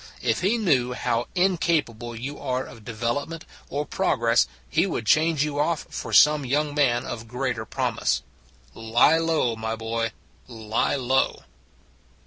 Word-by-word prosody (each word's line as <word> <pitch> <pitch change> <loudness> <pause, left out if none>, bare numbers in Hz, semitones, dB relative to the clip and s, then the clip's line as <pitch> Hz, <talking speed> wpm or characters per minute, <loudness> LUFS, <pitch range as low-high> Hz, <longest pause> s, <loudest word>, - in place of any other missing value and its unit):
If - - +1
he 200 +6 +2
knew 130 - +2
how 120 -1 -1
incapable 160 - 0
you 135 +6 -6
are 130 0 -2
of 115 - -12
development 120 +9 -3 0.2
or 145 +1 -2
progress 120 - +2 0.2
he - - +1
would 115 - -3
change 155 +4 +3
you 145 -1 -2
off 160 +1 0
for - - -5
some 150 -1 +6
young 145 +3 0
man 130 -4 +2
of 115 -1 -6
greater 125 -2 -3
promise. - - -1 0.5
Lie 120 +8 +3
low, 160 -8 +1
my 110 0 -3
boy, 115 0 -2 0.4
lie 110 0 -1
low. 130 0 0
125 Hz, 140 wpm, -25 LUFS, 115-150 Hz, 0.5 s, some